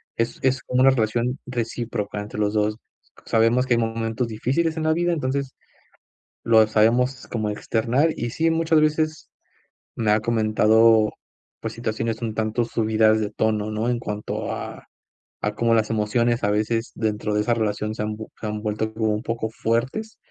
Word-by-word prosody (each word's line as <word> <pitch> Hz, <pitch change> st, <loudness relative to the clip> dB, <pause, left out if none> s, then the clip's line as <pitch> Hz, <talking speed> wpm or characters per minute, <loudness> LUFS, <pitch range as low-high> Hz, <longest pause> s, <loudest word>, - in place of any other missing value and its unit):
es 115 Hz, +1 st, -2 dB
es 130 Hz, 0 st, +1 dB
como 125 Hz, 0 st, 0 dB
una 135 Hz, -, +7 dB
relación 120 Hz, +2 st, 0 dB
recíproca 115 Hz, -4 st, -3 dB
entre 105 Hz, +1 st, -7 dB
los 105 Hz, 0 st, +1 dB
2. 105 Hz, 0 st, +1 dB, 0.5 s
Sabemos 115 Hz, +3 st, +3 dB
que 125 Hz, -, +2 dB
hay 120 Hz, -, +2 dB
momentos 115 Hz, +1 st, -1 dB
difíciles 135 Hz, +9 st, -1 dB
en 160 Hz, -, -1 dB
la 160 Hz, 0 st, +3 dB
vida, 175 Hz, +1 st, +1 dB
entonces, 140 Hz, -3 st, -2 dB, 0.9 s
lo 110 Hz, -1 st, +6 dB
sabemos 120 Hz, +5 st, +2 dB
como 110 Hz, -3 st, -2 dB
externar, 120 Hz, +8 st, +1 dB
y 120 Hz, 0 st, -2 dB
sí, 165 Hz, +5 st, +1 dB
muchas 160 Hz, -1 st, +3 dB
veces 155 Hz, 0 st, 0 dB, 0.7 s
me 110 Hz, -2 st, +2 dB
ha 110 Hz, -, +3 dB
comentado, 110 Hz, 0 st, +4 dB, 0.5 s
pues, -, -, -5 dB
situaciones 115 Hz, 0 st, -3 dB
un 110 Hz, -2 st, -2 dB
tanto 110 Hz, +2 st, 0 dB
subidas 110 Hz, -1 st, +2 dB
de 105 Hz, -1 st, -2 dB
tono, 110 Hz, -1 st, 0 dB
¿no?, 110 Hz, +2 st, -1 dB
en 120 Hz, -1 st, +1 dB
cuanto 105 Hz, -3 st, -4 dB
a -, -, -7 dB, 0.6 s
a 105 Hz, 0 st, -2 dB
cómo 115 Hz, -1 st, +2 dB
las 110 Hz, -1 st, +1 dB
emociones 115 Hz, +2 st, +1 dB
a 105 Hz, -, +2 dB
veces 115 Hz, +2 st, -1 dB
dentro 105 Hz, -1 st, -1 dB
de 105 Hz, -, +2 dB
esa 120 Hz, +2 st, +1 dB
relación 110 Hz, -1 st, -1 dB
se -, -, -4 dB
han 105 Hz, 0 st, -2 dB
vue 110 Hz, 0 st, -8 dB
han 105 Hz, -1 st, -3 dB
vuelto 110 Hz, 0 st, -2 dB
como 110 Hz, -1 st, 0 dB
un 105 Hz, +2 st, -3 dB
poco 115 Hz, -1 st, -2 dB
fuertes 125 Hz, -, -2 dB
115 Hz, 175 wpm, -23 LUFS, 110-125 Hz, 0.9 s, una